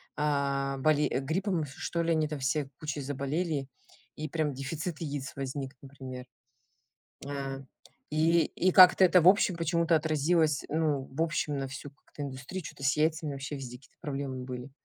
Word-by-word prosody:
а, 140 -2 0
боле 150 +1 +3
гриппом 170 +3 -1
что 170 +4 -3
ли, 165 - +1
они 155 -1 +2
там 150 -1 -4
все 135 +2 0
кучей 150 -2 -4
заболели, 140 +2 -2 0.5
и 155 0 -5
прям 155 -1 -1
дефицит 150 +5 -4
яиц 145 -3 -4
возник, 135 0 -4
например. 130 -2 -8 1.0
А, 135 -1 -4 0.5
и 160 +2 +3
и 185 +2 +1
как-то 185 0 +9
это, 180 0 +6
в 175 - +8
общем, 190 -2 +4
почему-то 170 0 +2
отразилось, 155 0 +2
ну, 150 -3 0
в 150 +5 -1
общем, 155 -3 -1
на 135 - -3
всю 135 +2 -8
как-то 145 0 -11
индустрию, 140 +7 -5
чё-то 140 - -10
с 140 +2 +3
яйцами 155 -1 +1
вообще 140 +2 -5
везде 125 -2 -7
какие-то 135 - -24
проблемы 135 -4 -4
были. 125 +1 -6
145 Hz, 160 wpm, -30 LUFS, 135-160 Hz, 1.0 s, как-то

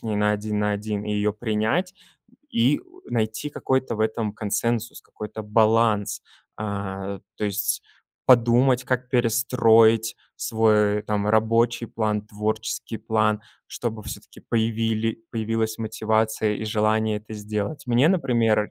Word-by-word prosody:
с - - -33
ней 110 -2 -2
на 105 0 +2
один 105 0 -2
на 105 0 +1
один, 105 0 -3
и 105 - -2
её 105 0 +1
принять, 110 - -1 0.4
м, 245 - -28
и 125 +6 +3
у 365 +1 -21
найти 110 +5 -1
какой-то 130 -4 -1
в - - -4
этом 110 -1 0
консенсус, 115 +2 -2
какой-то 110 +1 -8
баланс, 110 -1 +2 0.4
а, 100 -2 -4
э. - - -16 0.2
То - - -3
есть, 105 0 -1 0.4
подумать, 125 +1 +5
как 130 0 -1
перестроить 115 -2 +4 0.2
свой, 105 -2 +2
э, - - -5
там 105 -1 -1
рабочий 115 +2 +2
план, 105 -2 -1
творческий 110 +1 -3
план, 110 -1 +1 0.3
чтобы 110 -3 -4
всё-таки - - -9
появили 115 0 -1
появилась 110 0 -1
мотивация 110 -1 0
и 110 - -5
желание 110 0 +1
это 105 +1 -9
сделать. 105 +7 -4
Мне, 125 +5 +4
например 120 - +2
110 Hz, 140 wpm, -24 LUFS, 105-115 Hz, 0.4 s, подумать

